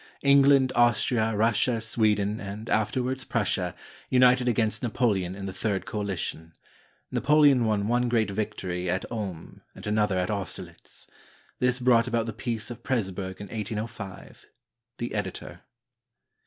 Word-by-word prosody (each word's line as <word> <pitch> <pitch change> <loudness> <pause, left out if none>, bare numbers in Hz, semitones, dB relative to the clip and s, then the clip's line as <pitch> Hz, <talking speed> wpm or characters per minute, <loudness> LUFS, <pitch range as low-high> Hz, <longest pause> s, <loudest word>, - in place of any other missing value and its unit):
England, 140 -1 +5
Austria, 120 -2 +2
Russia, 115 +2 +2
Sweden, 105 -2 0
and 105 +3 -7
afterwards 130 +4 0
Prussia, 95 -7 -1 0.3
united 125 0 +4
against 110 -2 +1
Napoleon 105 -6 0
in 100 0 -6
the 95 - -5
Third 100 -1 -2
Coalition. 95 -5 -4 0.6
Napoleon 145 -4 +4
won 105 -2 0
one 120 +1 +1
great 110 -4 +1
victory 95 -4 -3
at 95 +2 -1
Ulm 100 -8 -6
and 95 - -10
another 105 -2 +1
at 90 +2 0
Austerlitz. 100 -3 -7 0.5
This 125 0 +2
brought 120 -1 +4
about 115 -2 0
the 115 - -4
Peace 115 -1 -3
of 120 - -8
Presburg 95 -6 -2
in 100 - -7
1805. 110 -2 -6 0.5
The 120 - -4
Editor. 105 -3 -5
110 Hz, 130 wpm, -27 LUFS, 100-120 Hz, 0.6 s, England